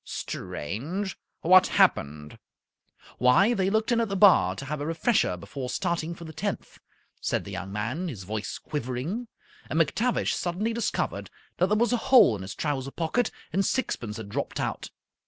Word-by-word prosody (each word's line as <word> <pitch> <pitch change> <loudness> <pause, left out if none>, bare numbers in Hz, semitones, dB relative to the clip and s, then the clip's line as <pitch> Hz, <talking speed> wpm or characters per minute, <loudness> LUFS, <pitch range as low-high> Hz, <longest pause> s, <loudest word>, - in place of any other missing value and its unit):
"Strange! 160 - -4 0.3
What 185 +2 +6
happened?" 75 +1 +2 0.8
"Why, 125 - +5
they 190 -4 +1
looked 220 +4 +1
in 235 -1 +3
at 225 - -1
the 195 - -2
bar 195 -1 +6
to 135 - -7
have 150 +1 -4
a - - -2
refresher 165 - +1
before 125 +8 -6
starting 170 0 -2
for 170 - -10
the 160 - -9
tenth," 195 +5 -4 0.4
said - - -1
the 100 - -8
young 95 0 -5
man, 115 - -3
his 115 - -6
voice 105 +2 -4
quivering, 150 - -4 0.4
"and 160 - 0
McTavish 220 - +1
suddenly 190 +6 -1
discovered 230 -2 -2 0.3
that 180 - +3
there 210 +2 +2
was 235 +2 +2
a - - +3
hole 240 - +7
in 100 - -7
his 95 +2 -7
trouser 135 -3 -2
pocket 170 - 0 0.2
and 195 +3 +2
sixpence 120 - -2
had 110 -3 -7
dropped - - -3
out. - - -3
165 Hz, 175 wpm, -27 LUFS, -, 0.8 s, hole